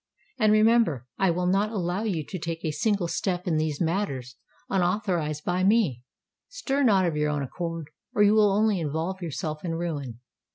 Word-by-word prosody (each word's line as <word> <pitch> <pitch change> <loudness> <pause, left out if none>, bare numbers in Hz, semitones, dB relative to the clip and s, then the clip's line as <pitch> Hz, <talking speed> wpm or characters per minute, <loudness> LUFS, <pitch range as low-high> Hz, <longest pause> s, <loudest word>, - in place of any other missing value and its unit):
And 215 -2 +4
remember—I 215 - +3
will 180 +1 0
not 195 +4 +2
allow 185 -2 -2
you 180 -9 -2
to 185 - -6
take 165 +1 -4
a 155 - 0
single 195 +3 0
step 180 +1 -2
in 165 -3 +1
these 155 -2 -1
matters, 160 -8 -2 0.3
unauthorised 175 -5 0
by 180 +1 0
me. 190 - +3 0.5
Stir 290 - -2
not 200 -8 +4
of 165 -3 0
your 150 0 +1
own 145 -1 -1
accord—or 165 +6 -3
you 205 +1 +5
will 210 -2 +5
only 210 -1 +2
involve 165 +5 -3
yourself 155 -2 -4
in 165 -2 -2
ruin. 145 -8 -4
175 Hz, 170 wpm, -26 LUFS, 155-205 Hz, 0.5 s, you